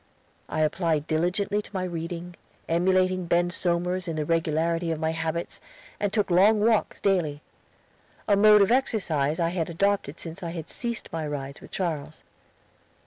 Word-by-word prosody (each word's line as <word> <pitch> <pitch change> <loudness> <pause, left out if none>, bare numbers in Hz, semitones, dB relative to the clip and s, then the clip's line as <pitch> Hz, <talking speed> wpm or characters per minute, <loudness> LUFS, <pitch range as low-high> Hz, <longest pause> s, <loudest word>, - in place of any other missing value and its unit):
I 155 - -1
applied 155 -1 +1
diligently 180 +6 0
to - - -14
my 185 - -1
reading, 175 0 -5 0.3
emulating 185 +1 +2
Ben 175 +1 +2
Somers 180 +1 -1
in 165 - -2
the 155 -1 -1
regularity 165 +1 0
of 160 -1 -2
my 160 0 0
habits, 165 +1 -3 0.4
and 205 -1 0
took 205 -3 0
long 205 +5 +5
walks 220 0 +2
daily 160 -7 0 0.8
a 205 - +5
mode 210 0 +7
of 195 - +1
exercise 165 - +1
I 165 -1 +2
had 170 -2 -2
adopted 180 -3 0
since 165 +3 -7
I 170 -2 -4
had 165 -2 -6
ceased 235 -2 -4
my 160 -2 -2
rides 140 -1 -5
with - - -12
Charles. 155 -5 -4
170 Hz, 160 wpm, -26 LUFS, 160-190 Hz, 0.8 s, mode